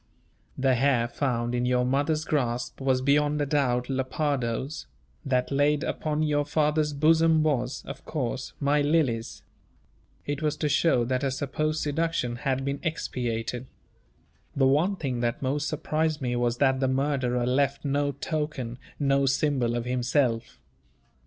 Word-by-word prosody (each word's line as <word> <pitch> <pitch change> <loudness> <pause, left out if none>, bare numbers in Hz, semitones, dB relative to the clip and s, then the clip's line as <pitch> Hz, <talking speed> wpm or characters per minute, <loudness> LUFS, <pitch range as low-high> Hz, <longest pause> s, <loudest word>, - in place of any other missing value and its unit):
The 130 0 +3
hair 125 -2 +2
found 120 -2 -1
in 120 0 0
your 125 0 +2
mother's 145 +4 0
grasp 120 -4 -1
was 130 -1 +2
beyond 145 +2 +2
a 145 - +1
doubt 125 -4 +1
Lepardo's; 135 0 -2 0.4
that 125 -1 0
laid 145 +2 +2
upon 155 -2 -1
your 145 -1 +1
father's 150 0 +1
bosom 160 +2 +4
was, 130 -4 -1
of - - -8
course, 130 -4 -3
my 145 +1 +2
Lily's. 145 -7 0 0.8
It 145 -1 -3
was 150 -1 0
to 150 - 0
show 140 -4 +3
that 130 +1 -1
her 140 - +1
supposed 155 +3 -2
seduction 150 -5 -1
had 135 +1 -1
been 140 0 -2
expiated. 125 -5 -3 0.9
The 135 - +3
one 155 +9 +3
thing 135 -9 -3
that 120 +4 -1
most 145 +3 0
surprised 155 0 -1
me 125 -3 -1
was 120 0 0
that 135 -1 +3
the 130 - +1
murderer 130 -2 0
left 140 +3 +1
no 145 0 +1
token, 140 -5 -3 0.2
no 140 -1 +2
symbol 130 -3 +1
of 120 0 -2
himself. 125 -1 0
140 Hz, 145 wpm, -27 LUFS, 125-150 Hz, 0.9 s, bosom